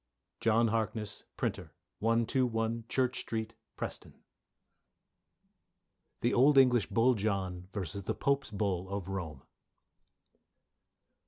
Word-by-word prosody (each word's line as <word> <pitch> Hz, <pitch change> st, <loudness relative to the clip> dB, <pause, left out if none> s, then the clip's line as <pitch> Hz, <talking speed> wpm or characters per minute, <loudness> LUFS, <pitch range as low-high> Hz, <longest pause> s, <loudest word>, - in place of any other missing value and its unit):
JOHN 115 Hz, +1 st, +3 dB
HARKNESS, 110 Hz, -2 st, -2 dB
Printer, 85 Hz, -4 st, -3 dB, 0.2 s
121, 115 Hz, 0 st, +1 dB
Church 130 Hz, -1 st, +1 dB
Street, 110 Hz, 0 st, -3 dB, 0.2 s
Preston. -, -, -6 dB, 2.1 s
THE 120 Hz, -, +2 dB
OLD 135 Hz, +3 st, +5 dB
ENGLISH 125 Hz, -4 st, +5 dB
BULL 120 Hz, +2 st, +3 dB
JOHN 95 Hz, -4 st, -2 dB
v. 95 Hz, -1 st, -3 dB
THE 100 Hz, -, -3 dB
POPE'S 140 Hz, 0 st, 0 dB
BULL 95 Hz, -3 st, -2 dB
OF 100 Hz, -2 st, -4 dB
ROME. 80 Hz, -8 st, -5 dB
110 Hz, 95 wpm, -32 LUFS, 95-120 Hz, 2.1 s, OLD